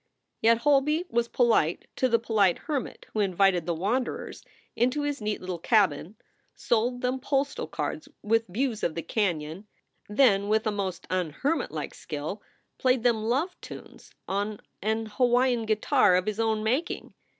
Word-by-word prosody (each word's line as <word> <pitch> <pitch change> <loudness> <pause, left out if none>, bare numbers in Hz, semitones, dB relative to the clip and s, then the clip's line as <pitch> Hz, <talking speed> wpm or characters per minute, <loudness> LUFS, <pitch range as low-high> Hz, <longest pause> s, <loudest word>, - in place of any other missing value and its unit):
Yet 230 +1 +5
Holby 295 +6 +2
was 235 0 +1
polite 225 -10 +2
to 260 - +2
the 230 - +4
polite 215 -5 +2
hermit 290 -6 -4
who 215 - -1
invited 190 -3 +2
the 170 - 0
wanderers 220 +10 -2 0.3
into 255 +5 +1
his 290 -3 -2
neat 210 0 -2
little 180 -2 -4
cabin, 190 -3 +2 0.4
sold 240 +2 0
them 255 +1 0
postal 275 +2 -2
SOULS 280 +1 +1
FOR - - -13
SALE - - -4
cards 305 -2 -4
with 225 +2 +2
views 225 +4 -2
of 160 - -1
the 165 - -3
canon, 170 -1 -2 0.4
then 210 -3 +4
with 215 +1 +2
a 215 - +1
most 195 -4 -3
unhermit 185 - -1
like - - -5
skill 155 +6 -6 0.4
played 255 -2 +2
them 235 -3 +3
love 280 +11 0
tunes - - -11 0.2
on 205 +2 -2 0.2
an 220 +2 0
Hawaiian 245 +1 +2
guitar 215 -1 +3
of 180 0 +1
his 215 0 -3
own 220 -1 +1
making. 260 +10 -1
220 Hz, 165 wpm, -27 LUFS, 195-250 Hz, 0.4 s, Yet